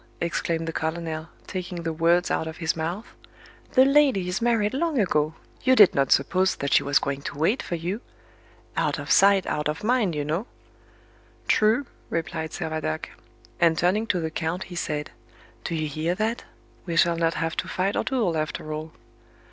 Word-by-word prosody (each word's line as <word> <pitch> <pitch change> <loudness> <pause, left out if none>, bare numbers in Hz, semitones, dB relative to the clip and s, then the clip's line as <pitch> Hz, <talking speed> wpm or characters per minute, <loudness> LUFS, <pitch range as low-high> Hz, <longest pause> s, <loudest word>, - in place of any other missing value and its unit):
exclaimed 165 -1 -1
the 165 - -3
colonel, 160 0 -3 0.2
taking 180 -2 -5
the 165 -1 -2
words 170 +2 +2
out 160 - 0
of 160 - -7
his 165 -1 -1
mouth; 170 +7 -3 0.7
"the 260 0 +7
lady 275 -9 +4
is 180 +5 -2
married 230 -2 +2
long 315 +1 0
ago; 155 -5 +1 0.3
you 260 0 +4
did 205 -6 +8
not 135 -1 +1
suppose 185 +7 +3
that 140 - -2
she - - +6
was 140 +1 +2
going 140 0 -2
to 145 - -6
wait 170 - +2
for 175 - -4
you. 180 +7 -3 0.7
'Out - - 0
of - - -5
sight, 195 -1 +5
out 150 0 -1
of 150 - -4
mind,' 220 -7 +2
you 145 -1 -2
know." 165 - -2 1.0
"True," 225 +6 +3 0.2
replied 160 -1 -3
Servadac; 155 - -3 0.5
and 165 -1 +4
turning 200 +6 +1
to 180 - +1
the 160 -1 -3
count 165 +4 -2
he 180 - -10
said, 150 -3 -3 0.5
"Do 170 - -3
you 155 -1 -1
hear 155 +4 -1
that? 220 +4 -2 0.4
We 170 - -2
shall 170 0 +4
not 165 0 +1
have 165 -1 -2
to - - -2
fight 190 +2 -1
our - - +1
duel 225 -11 0
after 155 0 -3
all." 155 +1 -6
170 Hz, 185 wpm, -25 LUFS, 160-200 Hz, 1.0 s, did